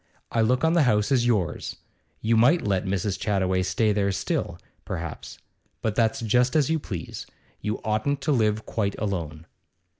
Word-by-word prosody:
I 115 Hz, -, +2 dB
look 125 Hz, +5 st, +2 dB
on 160 Hz, +1 st, +4 dB
the 170 Hz, -, +4 dB
house 110 Hz, -2 st, +2 dB
as 120 Hz, -3 st, +3 dB
yours. 105 Hz, -8 st, 0 dB, 0.5 s
You 115 Hz, +1 st, +2 dB
might 130 Hz, +10 st, +4 dB
let 100 Hz, -2 st, 0 dB
Mrs. 95 Hz, 0 st, -1 dB
Chattaway 95 Hz, -3 st, +1 dB
stay 105 Hz, +4 st, +1 dB
there 100 Hz, -1 st, +1 dB
still, 95 Hz, -, -2 dB, 0.3 s
perhaps; 80 Hz, -2 st, -6 dB, 0.5 s
but 110 Hz, -, 0 dB
that's 115 Hz, +1 st, +1 dB
just 125 Hz, +5 st, +2 dB
as 155 Hz, -1 st, +3 dB
you 160 Hz, -, +2 dB
please. 90 Hz, -, -6 dB, 0.3 s
You 105 Hz, 0 st, -2 dB
oughtn't 110 Hz, +6 st, 0 dB
to 155 Hz, -, 0 dB
live 110 Hz, -4 st, +1 dB
quite 100 Hz, -3 st, -2 dB
alone. 85 Hz, -6 st, -3 dB
110 Hz, 170 wpm, -25 LUFS, 100-125 Hz, 0.5 s, on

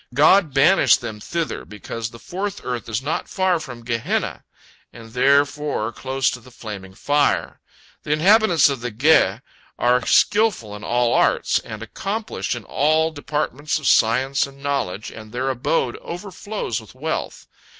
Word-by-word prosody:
God 155 Hz, +4 st, +5 dB
banished 140 Hz, -1 st, +5 dB
them 110 Hz, -3 st, -6 dB
thither 165 Hz, +8 st, -3 dB
because 110 Hz, +2 st, -6 dB
the 115 Hz, -, -12 dB
fourth 195 Hz, -, -5 dB
earth 125 Hz, -2 st, -4 dB
is 115 Hz, +3 st, -2 dB
not 150 Hz, -, -3 dB
far 185 Hz, -3 st, +1 dB
from 125 Hz, -6 st, -9 dB
Gehenna, 115 Hz, -1 st, -2 dB, 0.5 s
and 115 Hz, -1 st, -13 dB
therefore 140 Hz, -2 st, +2 dB
close 135 Hz, +2 st, -1 dB
to 125 Hz, -, -6 dB
the 125 Hz, +2 st, -16 dB
flaming 100 Hz, -6 st, -9 dB
fire. 145 Hz, +5 st, +1 dB, 0.4 s
The -, -, -5 dB
inhabitants 180 Hz, 0 st, +5 dB
of 140 Hz, -4 st, -2 dB
the 125 Hz, -, -3 dB
Ge 120 Hz, -3 st, +3 dB, 0.4 s
are 125 Hz, 0 st, +2 dB
skilful 205 Hz, -, +2 dB
in 105 Hz, -, -10 dB
all 120 Hz, +1 st, +1 dB
arts, -, -, +2 dB
and 110 Hz, 0 st, -8 dB
accomplished 200 Hz, -, -4 dB
in 120 Hz, -, -7 dB
all 155 Hz, +6 st, +1 dB
departments 150 Hz, -1 st, -2 dB
of 155 Hz, -, -7 dB
science 130 Hz, +5 st, +3 dB
and 140 Hz, 0 st, -15 dB
knowledge, 125 Hz, -8 st, -2 dB
and 110 Hz, -1 st, -11 dB
their 130 Hz, +3 st, -1 dB
abode 130 Hz, 0 st, -1 dB
overflows 185 Hz, -, -5 dB
with 110 Hz, +2 st, -16 dB
wealth. 160 Hz, +5 st, -4 dB
135 Hz, 150 wpm, -21 LUFS, 115-155 Hz, 0.5 s, God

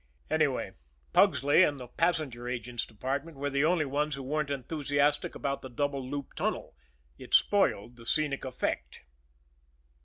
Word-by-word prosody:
Anyway, 155 Hz, -4 st, +1 dB, 0.4 s
Pugsley 145 Hz, +6 st, +5 dB
and 145 Hz, -6 st, +3 dB
the 125 Hz, -, -8 dB
passenger 140 Hz, -5 st, -1 dB
agent's 120 Hz, -1 st, -3 dB
department 135 Hz, +7 st, -4 dB
were 140 Hz, +1 st, -2 dB
the 140 Hz, +1 st, +2 dB
only 165 Hz, -1 st, +3 dB
ones 145 Hz, +2 st, 0 dB
who 135 Hz, -, -6 dB
weren't 150 Hz, +2 st, -1 dB
enthusiastic 145 Hz, +1 st, 0 dB
about 140 Hz, 0 st, -2 dB
the 130 Hz, -, -8 dB
double 140 Hz, +2 st, -1 dB
loop 140 Hz, +1 st, -5 dB
tunnel -, -, -2 dB, 0.4 s
it -, -, 0 dB
spoiled 120 Hz, -, +3 dB
the 115 Hz, -1 st, -12 dB
scenic 145 Hz, 0 st, 0 dB
effect. 95 Hz, -, -3 dB
140 Hz, 145 wpm, -30 LUFS, 125-150 Hz, 0.4 s, Pugsley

